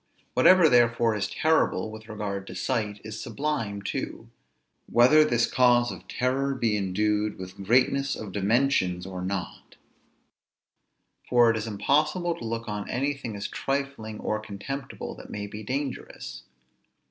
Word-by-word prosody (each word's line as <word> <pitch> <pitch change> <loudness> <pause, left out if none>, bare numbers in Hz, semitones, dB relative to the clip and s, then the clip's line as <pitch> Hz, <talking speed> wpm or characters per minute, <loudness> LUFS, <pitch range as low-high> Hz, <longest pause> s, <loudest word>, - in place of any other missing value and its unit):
Whatever 185 -3 +7
therefore 115 -3 +4
is 100 -1 -1
terrible, 155 -10 +1
with 110 0 -11
regard 100 -2 -4
to - - -8
sight, 105 -5 -1
is 110 0 -6
sublime 115 -6 -3
too, - - -5 0.6
whether 130 +6 +7
this 120 -6 +2
cause 120 0 +3
of - - -10
terror 135 +2 0
be 115 -4 +1
endued 105 +2 0
with 95 +1 -8
greatness 130 +5 +2
of 105 -3 -7
dimensions 100 -3 +1
or 95 -1 -6
not; 95 0 -5 1.5
for 120 -2 +6
it - - -2
is 110 +1 -3
impossible 150 - +1
to - - -10
look 115 +1 -3
on 105 -1 -4
anything 135 -3 -2
as 100 0 -4
trifling, 135 -6 -3
or 110 - -1
contemptible, 110 +6 -6
that - - -12
may 100 0 -4
be 105 +1 -8
dangerous. 135 +4 -5
115 Hz, 140 wpm, -27 LUFS, 105-135 Hz, 1.5 s, Whatever